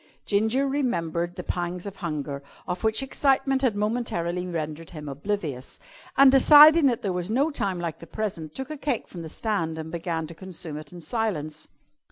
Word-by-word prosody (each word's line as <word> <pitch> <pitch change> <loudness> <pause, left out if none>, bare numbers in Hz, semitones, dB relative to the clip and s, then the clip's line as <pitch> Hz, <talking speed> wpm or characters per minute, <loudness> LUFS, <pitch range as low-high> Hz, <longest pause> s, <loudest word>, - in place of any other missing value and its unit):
Ginger 220 +7 +2
remembered 175 - -1
the 180 - -6
pangs 175 +1 -3
of 200 -1 -7
hunger, 150 -6 -4 0.3
of 180 0 -3
which 220 +4 +1
excitement 270 0 +1
had 250 -6 +2
momentarily 205 -5 -1
rendered 160 -1 -4
him 150 -3 -8
oblivious, 145 -2 -4 0.4
and, 275 -1 +8
deciding 300 +3 +8
that 240 -3 0
there 195 -3 0
was 180 +1 -2
no 275 +8 +2
time 200 -10 -1
like 170 -2 -4
the 170 - -11
present, 165 -6 -4
took 265 +3 -5
a 305 - -5
cake 275 -4 -2
from 175 - -8
the 160 - -7
stand 165 -5 -2
and 160 0 -6
began 165 -1 -2
to 165 - -9
consume 170 -3 -7
it 155 -1 -9
in 175 -1 -10
silence. 160 -9 -3
180 Hz, 185 wpm, -26 LUFS, 165-240 Hz, 0.4 s, and